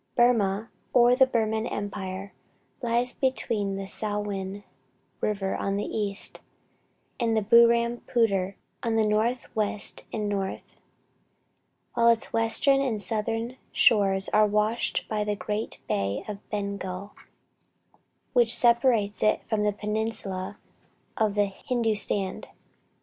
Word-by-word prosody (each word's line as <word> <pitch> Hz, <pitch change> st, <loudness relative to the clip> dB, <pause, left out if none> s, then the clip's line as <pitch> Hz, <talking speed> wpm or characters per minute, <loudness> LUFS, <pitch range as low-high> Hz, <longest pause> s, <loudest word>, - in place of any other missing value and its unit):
Burmah, 225 Hz, -3 st, +3 dB, 0.2 s
or 245 Hz, 0 st, +6 dB
the 265 Hz, 0 st, +5 dB
Burman 220 Hz, -3 st, 0 dB
Empire, 195 Hz, -1 st, -5 dB, 0.5 s
lies 240 Hz, +1 st, 0 dB
between 230 Hz, -7 st, -1 dB
the 195 Hz, 0 st, -4 dB
Salwen 205 Hz, -1 st, -4 dB, 0.6 s
river 195 Hz, -2 st, -1 dB
on 195 Hz, 0 st, -1 dB
the 205 Hz, -, -1 dB
east, 205 Hz, -2 st, -2 dB, 0.8 s
and 230 Hz, -2 st, +1 dB
the 215 Hz, -, +1 dB
Burrampooter 235 Hz, -3 st, +3 dB, 0.3 s
on 230 Hz, -1 st, -1 dB
the 220 Hz, -1 st, +3 dB
northwest 215 Hz, -1 st, -1 dB
and 210 Hz, -1 st, -2 dB
north, 195 Hz, -2 st, -4 dB, 1.2 s
while 235 Hz, -, +3 dB
its 230 Hz, -1 st, +2 dB
western 230 Hz, +5 st, +3 dB
and 245 Hz, -6 st, -1 dB
southern 225 Hz, +4 st, -2 dB
shores 195 Hz, -3 st, +4 dB
are 215 Hz, 0 st, +4 dB
washed 210 Hz, +3 st, 0 dB
by 215 Hz, -1 st, -1 dB
the 210 Hz, 0 st, -1 dB
great 210 Hz, +2 st, -4 dB
bay 100 Hz, +1 st, -1 dB
of 210 Hz, -2 st, -5 dB
Bengal, 200 Hz, -1 st, -4 dB, 1.2 s
which 235 Hz, -2 st, +4 dB
separates 235 Hz, -4 st, +3 dB
it 215 Hz, -, +2 dB
from 220 Hz, -2 st, -1 dB
the 210 Hz, 0 st, +2 dB
peninsula 210 Hz, -2 st, -3 dB, 0.6 s
of 215 Hz, -2 st, +1 dB
Hindustan. 205 Hz, -1 st, -1 dB
215 Hz, 110 wpm, -27 LUFS, 200-230 Hz, 1.2 s, or